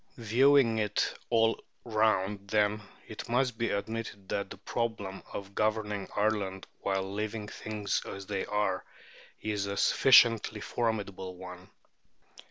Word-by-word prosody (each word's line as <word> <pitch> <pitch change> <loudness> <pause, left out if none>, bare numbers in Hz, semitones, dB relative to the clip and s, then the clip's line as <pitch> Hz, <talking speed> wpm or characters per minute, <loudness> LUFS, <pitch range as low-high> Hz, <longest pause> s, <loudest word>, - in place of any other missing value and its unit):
Viewing 120 +1 +4
it 105 -1 0 0.2
all 115 -1 +2 0.2
round, 105 -3 +1
then, 105 0 +2 0.3
it - - -8
must 125 0 +2
be 115 - +1
admitted 105 -2 -4
that 100 - -2
the - - -9
problem 110 -5 -3
of 100 0 -7
governing 105 -2 0
Ireland 100 -3 0
while 95 0 -1
leaving 105 0 -3
things 105 -1 -2
as 100 0 -7
they 100 -1 -3
are 105 -3 0 0.6
is 105 -2 -1
a 100 0 -3
sufficiently 115 -4 +5
formidable 100 -4 -2
one. 90 0 -10
105 Hz, 125 wpm, -30 LUFS, 100-110 Hz, 0.6 s, sufficiently